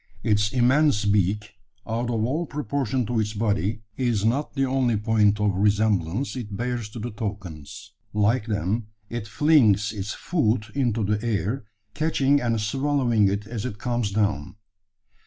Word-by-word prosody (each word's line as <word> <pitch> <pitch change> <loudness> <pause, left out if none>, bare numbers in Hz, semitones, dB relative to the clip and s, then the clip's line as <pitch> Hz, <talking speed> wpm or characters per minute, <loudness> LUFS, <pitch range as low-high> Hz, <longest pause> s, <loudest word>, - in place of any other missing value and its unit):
Its 105 -2 +2
immense 130 -2 +3
beak 100 +1 +1 0.3
out 115 +2 -2
of 110 -2 0
all 155 +7 -1
proportion 135 -3 -1
to 115 +2 -1
its 105 0 -1
body 105 0 -1
is 120 -5 0
not 135 +7 0
the 135 -1 +2
only 130 -4 +1
point 105 -1 +2
of 105 -1 +2
resemblance 105 - +1
it 105 -6 -5
bears 120 -2 -3
to 110 - -10
the 115 +2 -4
toucans. 100 -9 -7 0.2
Like 105 +3 +1
them, 105 +1 -1 0.2
it 115 -2 -4
flings 115 -7 +3
its 105 0 -4
food 115 -10 0
into 120 -5 0
the 105 +2 0
air, 110 +2 -1 0.3
catching 145 -2 +2
and 115 -2 0
swallowing 120 -1 +2
it 100 +1 -2
as 110 -1 -5
it 115 -5 -4
comes 120 -2 -1
down. 100 -6 -1
110 Hz, 155 wpm, -25 LUFS, 105-125 Hz, 0.3 s, immense